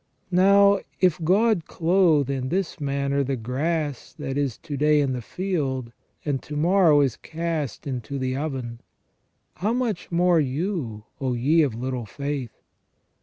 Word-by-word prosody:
Now 200 +2 +5 0.2
if 180 -2 +2
God 195 +1 +3
clothe 165 -5 +3
in 130 -2 -2
this 185 0 -2
manner 140 -1 0
the 135 0 -1
grass 145 +4 -2
that 135 - -4
is 140 -5 -1
to 155 -3 -6
day 150 +2 +3
in 140 -2 +1
the 125 - -3
field, 135 - -2 0.3
and 140 -3 -1
to 150 - -8
morrow 165 -1 +4
is 135 -5 +1
cast 160 -6 -4
into 135 0 -4
the 130 -1 -1
oven: 130 -5 -4 0.8
how 210 +5 0
much 240 -9 -2
more 175 0 +4
you, 140 - -2 0.2
O 130 -2 -1
ye 145 +8 +3
of 135 -7 +1
little 125 -1 -4
faith. 140 0 -5
145 Hz, 150 wpm, -24 LUFS, 130-175 Hz, 0.8 s, Now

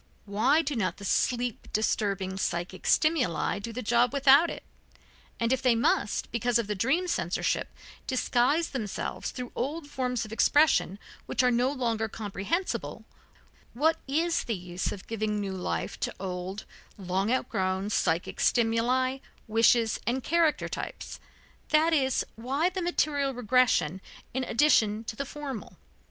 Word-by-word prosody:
Why 225 +10 +2
do 290 -1 -2
not 200 -5 -1
the 200 - -8
sleep 245 +3 0
disturbing 200 -3 0
psychic 175 +1 -3
stimuli 305 - +2
do 230 +3 -6
the 250 +3 -5
job 240 +2 +3
without 280 +4 +6
it? - - -7 0.8
And 230 +2 +2
if 260 - -1
they 250 -3 +4
must, 225 -2 0
because 235 +1 +1
of 235 - 0
the 210 - -2
dream 270 - +1
censorship, 345 - -1 0.4
disguise 260 +5 +1
themselves 220 -7 -4
through 250 -2 -7
old 290 +5 -3
forms 250 -4 -2
of 215 - -11
expression 290 -5 +3 0.3
which - - +1
are 250 - +4
no 245 +3 +2
longer 230 -5 -1
comprehensible, 220 - -3 0.7
what 320 +5 +2
is 325 +5 0
the 230 - -1
use 180 0 -4
of 195 - -8
giving 215 -2 -2
new 195 -2 -3
life 185 -1 -3
to - - -2
old, 185 +1 -5 0.3
long 190 +2 -1
outgrown 190 -5 -1
psychic 165 -3 0
stimuli, 245 +3 +2 0.3
wishes 225 0 +3
and 255 +2 0
character 330 -2 +2
types, - - -6 0.5
that 315 +2 +4
is, 265 -4 +2
why 270 +9 0
the 375 0 -3
material 290 -6 0
regression 240 -7 +2 0.3
in 260 +1 -1
addition 225 -6 +3
to 220 - -6
the 280 - -3
formal? 275 -6 -7
240 Hz, 145 wpm, -28 LUFS, 210-275 Hz, 0.8 s, without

